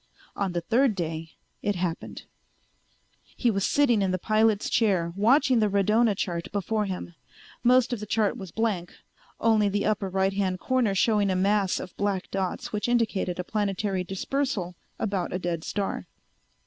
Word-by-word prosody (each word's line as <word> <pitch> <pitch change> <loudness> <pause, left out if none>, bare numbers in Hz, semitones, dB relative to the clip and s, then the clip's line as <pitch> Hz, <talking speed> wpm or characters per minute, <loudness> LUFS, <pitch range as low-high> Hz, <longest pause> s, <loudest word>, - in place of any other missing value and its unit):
On 195 -3 -1
the 175 - -1
third 235 +5 +2
day 165 -2 -4 0.3
it 205 0 0
happened. 175 -2 -4 1.1
He 240 - +2
was 195 -2 -1
sitting 245 -6 +3
in 195 - +1
the 185 - 0
pilot's 215 +2 +2
chair, 185 -7 +1
watching 255 +5 +4
the 215 -1 +2
radona 210 +2 +3
chart 170 -3 -3
before 210 +2 -1
him. 185 -2 -5 0.5
Most 250 0 +4
of 240 - -2
the 210 - -7
chart 210 -1 +1
was 190 -2 -8
blank, 195 -3 -2 0.4
only 220 -2 +3
the 205 +1 -1
upper 210 -2 0
right 190 +1 +1
hand 190 -2 -1
corner 250 -6 +1
showing 210 0 +3
a 185 - +1
mass 195 0 +2
of 180 - -8
black 200 -2 -1
dots 190 +1 -3
which 210 +2 -1
indicated 220 -7 0
a 180 - -2
planetary 200 -1 -1
dispersal 195 0 -2 0.2
about 195 -4 -2
a - - 0
dead 175 -3 -3
star. 200 -2 -3
200 Hz, 165 wpm, -26 LUFS, 185-220 Hz, 1.1 s, watching